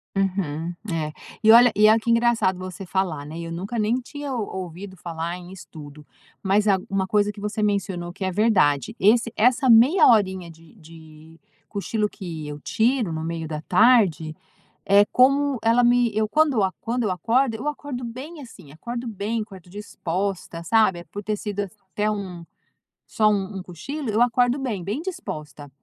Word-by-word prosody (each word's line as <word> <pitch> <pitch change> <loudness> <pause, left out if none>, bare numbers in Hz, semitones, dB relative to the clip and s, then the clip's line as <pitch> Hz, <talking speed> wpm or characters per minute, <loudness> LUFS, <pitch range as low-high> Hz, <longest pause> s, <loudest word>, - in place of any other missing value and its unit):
Uhum, 175 -4 -2 0.2
é. 155 -2 -2 0.3
E 220 - +6
olha 240 0 +7
e 215 +1 +5
olha 220 +1 +5
que 235 +1 -3
engraçado 230 -5 +2
você 185 +1 -7
falar, 170 -5 -2
né, 155 +3 -8
eu 165 0 -6
nunca 195 +8 -5
nem 220 +4 +1
tinha 285 +3 -7
ou 220 -4 -2 0.2
ouvido 185 +3 -9
falar 170 0 -5
em 180 0 -12
estudo, 150 -5 -12 0.4
mas, 205 +2 +2
ah 195 - +5
uma 195 -1 0
coisa 210 +1 +1
que 205 - -12
você 210 +1 -3
mencionou 195 -4 -1
que 190 - -11
é 190 - 0
verdade, 185 - +2
esse 230 +3 +3
essa 250 +3 +3
meia 250 +11 +6
horinha 190 -6 +2
de 165 +4 -18
de 160 -2 -16 0.3
cochilo 210 +1 -2
que 165 -5 -7
eu 150 0 -7
tiro 230 -4 0
no 160 0 -4
meio 165 -1 -4
da 155 -1 -5
tarde, 180 - +3 0.5
é 200 +1 +6
como, 275 +1 +3
ela 230 +2 +3
me 240 -1 +3
eu 215 0 +2
quando 295 0 +2 0.2
quando 240 +2 -2
eu 210 - 0
acordo, 230 +5 +1
eu 255 +7 -4
acordo 285 -4 -5
bem 265 +7 -8
assim, 190 - -13
acordo 235 +9 -6
bem, 220 +1 -3
acordo 190 -4 -12
disposta, 185 -3 -4
sabe, 190 -4 +2
por 205 - -8
ter 210 +1 -2
sido 205 -1 -4
assi 200 +1 -6 0.2
até 210 +1 0
um, 185 -5 -6 0.6
só 215 -1 +1
um 195 -1 -2
cochilo, 225 - -6
eu 215 +3 +1
acordo 245 +1 +3
bem, 230 -9 -3
bem 215 - -3
disposta. 155 - -7
205 Hz, 175 wpm, -23 LUFS, 175-230 Hz, 0.6 s, olha